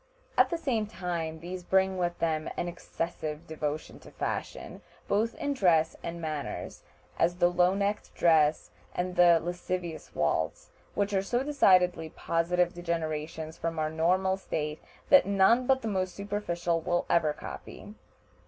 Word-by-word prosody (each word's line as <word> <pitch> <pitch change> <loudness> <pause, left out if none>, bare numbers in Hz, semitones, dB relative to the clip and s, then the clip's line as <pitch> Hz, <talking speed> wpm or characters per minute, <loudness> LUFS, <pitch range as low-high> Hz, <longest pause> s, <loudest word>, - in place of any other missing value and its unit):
At - - +5
the 340 - -1
same 240 -9 -1
time 170 -5 -4
these 180 +2 -6
bring 190 +1 +2
with 175 -1 -1
them 160 -1 -1
an 175 - -1
excessive 165 -2 -5
devotion 155 -1 -4
to - - -14
fashion, - - -5 0.3
both 220 +3 +1
in 290 -3 -2
dress 165 - +3
and 170 0 -5
manners, 155 -3 -5 0.4
as 175 +1 +3
the 175 -1 +3
low 180 +1 +3
necked 205 +1 -1
dress 155 -2 +3 0.2
and 180 0 -2
the 175 -1 +6
lascivious 175 0 -5
waltz, 75 +1 -1 0.2
which 205 0 0
are 190 - +3
so 240 +6 -1
decidedly 185 - +3
positive 175 +2 0
degenerations 160 -2 -4
from 165 0 -2
our 155 0 0
normal 185 +4 +2
state 150 -5 -4 0.3
that 280 -5 +7
none 200 +6 +4
but 265 -1 +3
the - - -2
most 185 -3 -1
superficial 175 -5 -2
will 175 +2 0
ever 160 -3 +3
copy. 205 +6 -9
175 Hz, 150 wpm, -29 LUFS, 160-195 Hz, 0.4 s, that